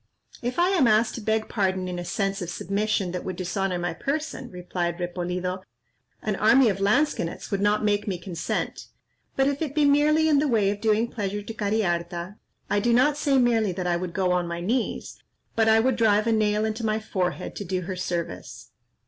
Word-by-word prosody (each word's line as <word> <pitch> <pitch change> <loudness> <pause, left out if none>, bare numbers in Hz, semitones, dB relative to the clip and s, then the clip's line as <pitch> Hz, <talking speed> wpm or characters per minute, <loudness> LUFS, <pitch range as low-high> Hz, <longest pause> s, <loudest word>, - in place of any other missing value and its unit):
"If 245 +1 -3
I 350 +1 +4
am 355 -10 +3
asked 220 +1 +3
to 235 - -6
beg 220 +1 0
pardon 190 -3 -1
in 180 -1 -4
a - - -4
sense 195 +2 -2
of 175 - -4
submission 200 +1 -1
that 180 0 -4
would 185 - -4
dishonour 185 +1 -2
my 175 0 -2
person," 275 - -3
replied 175 -1 -3
Repolido, 180 +1 -3 0.6
"an 210 -2 -1
army 230 +3 +5
of 195 -1 -2
lansquenets 200 - 0
would 200 -1 0
not 205 +1 +2
make 205 0 +1
me 190 -3 -1
consent; 175 -2 -4 0.5
but 270 - +3
if 285 +1 -1
it 295 -3 -3
be 300 -1 +4
merely 300 +2 +4
in 295 -2 +4
the 300 - +2
way 215 -6 +2
of 205 0 -6
doing 220 +1 +2
pleasure 205 -2 -4
to 225 - -7
Cariharta, 190 -3 -1 0.3
I 205 - +1
do 235 +3 +2
not 260 +5 +4
say 285 -2 +2
merely 230 -6 +2
that 180 +1 -4
I 175 -1 +1
would 175 0 -4
go 185 -1 +1
on 180 -1 +1
my 170 0 -4
knees, 225 +8 -2 0.4
but 225 -1 +3
I 220 0 +6
would 250 +1 +2
drive 215 -2 +3
a 230 - +2
nail 215 -1 +2
into 220 +1 -3
my 215 0 +1
forehead 185 -4 -3
to - - -4
do 185 0 -2
her 185 +1 -5
service." 160 -9 -5
205 Hz, 210 wpm, -25 LUFS, 180-230 Hz, 0.6 s, I